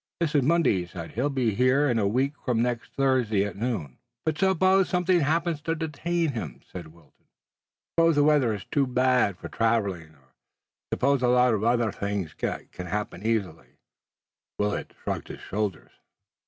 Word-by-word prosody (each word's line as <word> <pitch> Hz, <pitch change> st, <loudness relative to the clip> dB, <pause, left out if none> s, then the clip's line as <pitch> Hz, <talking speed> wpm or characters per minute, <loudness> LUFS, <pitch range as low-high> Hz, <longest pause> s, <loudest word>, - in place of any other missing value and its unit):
"This 165 Hz, -2 st, 0 dB
is 145 Hz, -, +4 dB
Monday," 165 Hz, -, +3 dB
he 90 Hz, -, -4 dB
said. 85 Hz, -2 st, -8 dB
"He'll 125 Hz, +7 st, -1 dB
be 130 Hz, -6 st, 0 dB
here 130 Hz, +6 st, +3 dB
a 110 Hz, -4 st, +1 dB
week 130 Hz, +7 st, +1 dB
from 125 Hz, -3 st, 0 dB
next 120 Hz, 0 st, -1 dB
Thursday 125 Hz, -7 st, +2 dB
at 100 Hz, -, -5 dB
noon." 105 Hz, -, -3 dB, 0.3 s
"But 155 Hz, -1 st, -1 dB
suppose 190 Hz, 0 st, +3 dB
something 180 Hz, 0 st, +2 dB
happens 165 Hz, +1 st, 0 dB
to 165 Hz, +2 st, -1 dB
detain 165 Hz, +1 st, -1 dB
him," 80 Hz, -, -6 dB
said 85 Hz, -3 st, -7 dB
Wilton, 80 Hz, -2 st, -24 dB, 0.7 s
"suppose 165 Hz, -1 st, +4 dB
the 145 Hz, -, +4 dB
weather 145 Hz, -6 st, +4 dB
is 100 Hz, -, -9 dB
too 140 Hz, -2 st, +2 dB
bad 125 Hz, -6 st, +2 dB
for -, -, -8 dB
traveling, 100 Hz, -9 st, -1 dB
or 65 Hz, -1 st, -29 dB, 0.6 s
suppose 140 Hz, 0 st, +2 dB
a 125 Hz, -, +2 dB
lot 125 Hz, 0 st, +4 dB
of 105 Hz, -1 st, -1 dB
other 120 Hz, -1 st, +2 dB
things 100 Hz, -6 st, -3 dB
that -, -, -4 dB
can 90 Hz, -, -7 dB
happen 105 Hz, 0 st, -4 dB
easily." 110 Hz, -7 st, -2 dB, 0.8 s
Willet 105 Hz, 0 st, -2 dB
shrugged -, -, -3 dB
his -, -, -9 dB
shoulders. 100 Hz, -4 st, -3 dB
125 Hz, 170 wpm, -26 LUFS, 100-145 Hz, 0.8 s, is